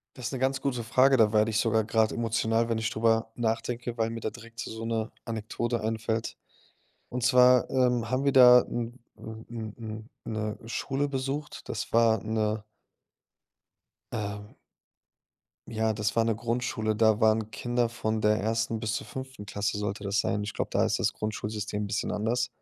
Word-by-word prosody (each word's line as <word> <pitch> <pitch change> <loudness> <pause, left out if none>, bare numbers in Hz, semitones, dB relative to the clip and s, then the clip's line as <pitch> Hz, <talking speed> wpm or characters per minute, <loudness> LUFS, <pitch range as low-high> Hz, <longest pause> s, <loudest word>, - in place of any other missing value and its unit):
Das 125 - -8
ist - - -4
'ne 130 - -2
ganz 135 +1 0
gute 125 -4 -1
Frage, 130 +4 +4
da 110 -2 +4
werde 110 +1 +4
ich 110 - 0
sogar 110 -1 +2
grad 110 0 +2
emotional, 115 0 0
wenn 115 - +1
ich 110 +1 -1
drüber 115 0 +1
nachdenke, 120 +1 -2
weil 115 0 0
mir 115 - -5
da 110 - -2
direkt 115 0 -13
so 110 +1 -5
'ne 115 -1 -2
Anekdote 115 +1 -2
einfällt. 110 +1 -2 0.7
Und 125 -1 -3
zwar, 125 0 +6
ähm, 125 -3 +1
haben 130 +2 0
wir 140 - +4
da 125 -2 +9
'n 120 0 -4 0.2
'n 110 0 -9
'n 110 -3 -6
'n 110 -1 -8 0.2
'ne 110 -1 -2
Schule 140 +4 -1
besucht. 140 +2 -4
Das - - -4
war 115 -2 +4
'ne 110 -1 -1 1.5
ähm 105 -1 -5 1.1
ja, 110 -1 0
das 105 -1 -1
war 115 - +4
'ne 115 -1 +1
Grundschule. 115 -1 -1
Da 110 0 +3
waren 110 0 +3
Kinder 120 +1 0
von 110 -1 -2
der 105 0 +3
1. 115 +1 -1
bis 110 -2 -1
zur - - -5
5. 130 -5 -8
Klasse 100 +1 -2
sollte 105 0 -3
das 100 0 0
sein. 105 +1 0
Ich 105 - -5
glaube, - - -2
da - - +2
ist - - +1
das - - +1
Grundschulsystem 105 -1 -3
'n 100 - -3
bisschen 105 +1 -2
anders. 115 +4 0
115 Hz, 180 wpm, -28 LUFS, 110-120 Hz, 1.5 s, da